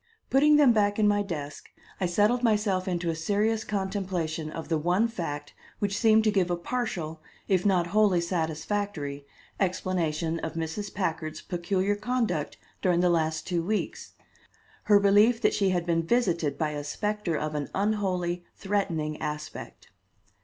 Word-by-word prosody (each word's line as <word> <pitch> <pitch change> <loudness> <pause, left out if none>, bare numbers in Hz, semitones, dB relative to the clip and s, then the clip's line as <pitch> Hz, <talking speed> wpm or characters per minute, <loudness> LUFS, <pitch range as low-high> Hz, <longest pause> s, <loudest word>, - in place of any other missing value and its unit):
Putting 295 +3 +5
them 285 -5 +6
back 205 -2 +2
in 215 -1 +4
my 205 0 +3
desk, 150 -7 -6 0.3
I 185 - +1
settled 210 +7 +2
myself 210 -5 +1
into 175 -2 -1
a - - -4
serious 210 +6 0
contemplation 190 -6 -2
of 160 +1 -6
the 160 -2 0
one 180 +8 +2
fact 145 -9 -5 0.2
which 200 -1 -1
seemed 220 0 +4
to 215 - +3
give 190 -3 +1
a 175 - +1
partial 175 -5 -3 0.3
if 190 0 +2
not 180 -3 +3
wholly 210 -4 +4
satisfactory 160 -3 -3 0.3
explanation 175 -4 -1
of 160 -1 -4
Mrs. 165 +5 -4
Packard's 165 -4 -3
peculiar 185 +2 0
conduct 215 - -1 0.2
during 175 -2 +2
the 180 -1 +3
last 160 -1 0
two 175 -2 0
weeks 210 +5 -3 0.7
her 205 -1 +6
belief 205 +4 +5
that 210 - +3
she 195 -2 +2
had 175 -2 0
been 165 -1 +1
visited 170 - +1
by 155 -2 0
a 145 -1 -4
specter 205 +2 -2
of 155 0 -3
an 145 -2 -3
unholy, 185 -4 0
threatening 170 -7 -2
aspect. 150 -1 -6
185 Hz, 155 wpm, -27 LUFS, 160-205 Hz, 0.7 s, them